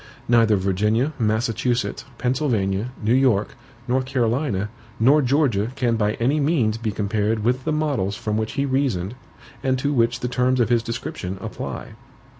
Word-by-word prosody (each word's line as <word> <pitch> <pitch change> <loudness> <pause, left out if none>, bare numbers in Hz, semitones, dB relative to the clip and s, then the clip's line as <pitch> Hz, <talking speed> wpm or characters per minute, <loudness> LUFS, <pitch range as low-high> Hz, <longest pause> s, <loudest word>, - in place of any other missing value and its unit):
Neither 115 -2 +4
Virginia, 105 +9 +1
Massachusetts, 115 +2 0
Pennsylvania, 120 -5 0
New 110 +3 +3
York, 125 -6 +2 0.3
North 130 +1 +1
Carolina, 120 -5 0 0.3
nor 140 +7 +5
Georgia 125 -6 +2
can 120 -4 +1
by 105 -1 +1
any 135 +6 +1
means 135 -8 +1
be 110 -2 -2
compared 105 +1 -1
with 125 +3 0
the 155 - 0
models 140 -11 0
from 105 0 -3
which 110 0 -2
he 140 - 0
reasoned 130 -8 0 0.5
and 130 -1 +1
to 140 +3 0
which 120 -2 +1
the 125 - -1
terms 125 +1 +1
of 120 - +2
his 120 -1 +3
description 115 -5 -5
apply. - - -6
120 Hz, 155 wpm, -23 LUFS, 105-130 Hz, 0.5 s, nor